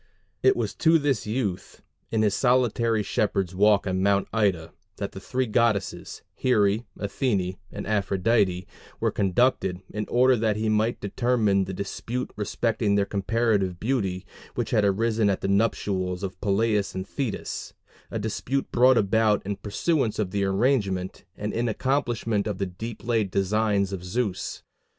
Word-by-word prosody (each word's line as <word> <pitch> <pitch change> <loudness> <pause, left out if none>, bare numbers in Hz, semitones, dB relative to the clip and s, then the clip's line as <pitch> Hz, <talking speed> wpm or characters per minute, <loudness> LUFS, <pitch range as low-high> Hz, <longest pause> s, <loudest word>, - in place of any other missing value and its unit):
It 395 - +5
was - - -2
to 165 0 +5
this 140 -8 0
youth, 105 -5 -3 0.3
in 110 -1 +1
his 105 -2 +2
solitary 120 -3 +2
shepherd's 95 -3 0
walk 100 +1 +4
on 95 -1 -1
Mount 100 0 +2
Ida, 95 -7 0 0.2
that 100 - -4
the 95 - -8
three 130 +6 -1
goddesses, 110 -3 0
Here, 105 -5 +2 0.2
Athene, 100 -4 -1
and - - -6
Aphrodite, 100 -2 +1 0.3
were - - +1
conducted, 95 -2 +1
in 105 0 -3
order 130 +1 +4
that 110 -2 +1
he 110 +1 -1
might 110 +2 +1
determine 105 -2 +1
the - - -6
dispute 115 +6 -4
respecting 105 0 0
their 100 -1 +2
comparative 100 -3 0
beauty, 100 -6 -1 0.3
which - - -2
had 105 - +3
arisen 110 +2 +2
at 95 - -1
the - - -1
nuptials 100 -3 0
of 95 -1 -5
Peleus 105 0 +1
and 95 +1 -4
Thetis, 135 -7 -4 0.3
a - - -4
dispute 115 +5 -2
brought 125 +1 +5
about 105 0 +2
in 100 0 -3
pursuance 115 +3 0
of 100 -4 -1
the 100 0 0
arrangement, 95 -3 0
and 105 0 -3
in 120 +1 0
accomplishment 115 -4 0
of 105 - -2
the 100 - -1
deep 105 +5 -7
laid 115 -4 +1
designs 100 +1 +1
of 90 -2 -5
Zeus. 95 0 -3
105 Hz, 155 wpm, -25 LUFS, 95-115 Hz, 0.3 s, It